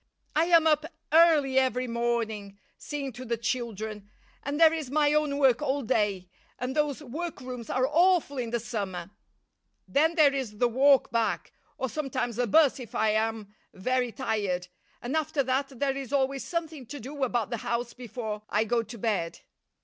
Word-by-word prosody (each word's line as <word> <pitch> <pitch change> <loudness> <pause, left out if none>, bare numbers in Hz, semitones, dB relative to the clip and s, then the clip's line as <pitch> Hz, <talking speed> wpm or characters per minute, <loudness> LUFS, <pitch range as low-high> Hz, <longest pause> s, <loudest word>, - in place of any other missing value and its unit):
I 315 +2 +4
am 335 -2 +5
up 305 0 +3 0.2
early 305 -5 +5
every 255 -1 +1
morning 230 -4 -2 0.2
seeing 280 -3 -5
to 250 +3 -8
the 235 -1 -2
children, 220 -3 -4 0.3
and 285 +2 -3
there 325 -1 +7
is 310 -5 -4
my 295 +1 +3
own 300 -2 +1
work 265 -3 +4
all 280 -1 0
day, 205 -6 0 0.3
and 250 +1 -3
those 295 -1 0
workrooms 255 -5 -6
are 255 0 +1
awful 330 -2 +3
in 235 -2 -2
the 235 +1 -1
summer; 200 -6 -4 0.8
then 320 +4 +2
there 300 -4 +5
is 250 -7 -4
the 245 - +3
walk 270 +3 +4
back, 230 -1 -1 0.2
or 260 - -1
sometimes 255 -4 -3
a 245 - +2
'bus 285 +4 +4
if 240 -4 -9
I 215 0 +2
am 220 -1 -1 0.2
very 250 +5 0
tired, 200 -8 -2 0.3
and 250 +5 -2
after 310 -2 0
that 265 +1 -1
there 275 -1 +1
is 270 -3 -6
always 275 -1 0
something 320 -6 -4
to 290 +4 -7
do 275 +4 -5
about 240 -3 0
the 235 - -1
house 235 +2 -3
before 225 -3 -6
I 210 +2 +2
go 235 +1 +1
to 230 +2 -9
bed." 195 -6 -2
255 Hz, 175 wpm, -28 LUFS, 225-285 Hz, 0.8 s, there